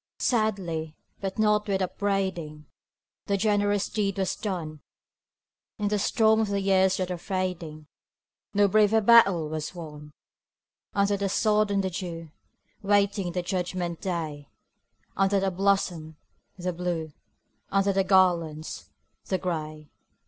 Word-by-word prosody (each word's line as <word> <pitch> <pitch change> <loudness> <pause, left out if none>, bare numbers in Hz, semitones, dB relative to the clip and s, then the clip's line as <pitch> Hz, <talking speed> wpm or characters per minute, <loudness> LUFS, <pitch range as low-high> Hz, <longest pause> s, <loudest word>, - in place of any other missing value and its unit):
Sadly, 185 -9 -1 0.2
but 195 -1 -4
not 210 -1 +2
with 195 -1 0
upbraiding, 185 -6 -2 0.6
The 200 - +1
generous 205 -1 +1
deed 200 -2 -1
was 190 -1 0
done, 165 -8 -5 1.0
In 205 -1 -1
the 210 0 0
storm 220 +1 +3
of 220 - +1
the 200 0 -1
years 190 -1 +3
that 185 -1 -2
are 180 - -4
fading 175 -5 -4 0.7
No 205 0 +4
braver 215 +2 +4
battle 200 -7 +5
was 155 +3 -5
won: 150 -3 -9 0.8
Under 200 0 +2
the 200 0 -1
sod 210 +1 +2
and 200 -1 +1
the 190 - -2
dew, 165 -3 -6 0.5
Waiting 200 -2 +1
the 180 0 -2
judgment 180 -2 -3
day; 155 -6 -4 0.7
Under 195 +1 +2
the 195 0 0
blossoms, 180 -4 0 0.4
the 180 0 -3
Blue 170 -3 -3 0.6
Under 195 0 +2
the 195 0 +2
garlands, 175 -5 +1 0.4
the 190 - 0
Gray. 155 -4 -5
190 Hz, 130 wpm, -27 LUFS, 170-200 Hz, 1.0 s, battle